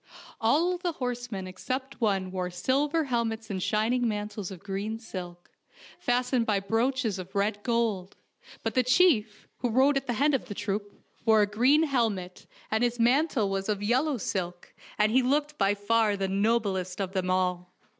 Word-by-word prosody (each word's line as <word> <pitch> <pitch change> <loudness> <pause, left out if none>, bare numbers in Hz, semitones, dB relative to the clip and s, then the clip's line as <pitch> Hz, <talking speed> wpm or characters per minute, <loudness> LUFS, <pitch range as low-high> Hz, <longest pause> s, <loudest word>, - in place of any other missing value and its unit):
All 330 +11 +2
the 350 -2 -2
horse 245 -3 -4
men 190 -2 -4
except 255 +9 -5
one 195 -4 +1
wore 185 -1 -2
silver 285 - +1
helmets 230 -4 -2
and 190 -2 -3
shining 230 +5 +1
mantles 210 -2 -3
of 185 -3 -10
green 200 +3 -3
silk, 180 -6 -8 0.5
fastened 245 -1 +1
by 210 -2 +2
brooches 225 0 0
of 185 +1 -9
red 205 +1 0
gold, 220 -5 -1 0.5
but - - -1
the 255 - +4
chief, 250 - +2
who 245 - -1
rode 265 +5 +4
at 275 - -3
the 245 - 0
head 285 +6 +2
of 270 - 0
the 205 - -7
troop, 205 +1 -3 0.3
wore 220 -2 +5
a - - +4
golden 250 +9 +3
helmet, 220 - -1 0.2
and 220 +2 +1
his 240 0 0
mantle 250 -1 +3
was 195 +1 -2
of 205 -1 -1
yellow 260 +6 +1
silk, 180 -4 -4 0.2
and 215 0 +3
he 260 +3 +4
looked 295 +4 0
by 200 0 +3
far 210 0 +2
the 195 -1 -1
noblest 195 -2 0
of 190 -2 -2
them 185 -2 -1
all. 180 -1 0
220 Hz, 175 wpm, -28 LUFS, 195-250 Hz, 0.5 s, wore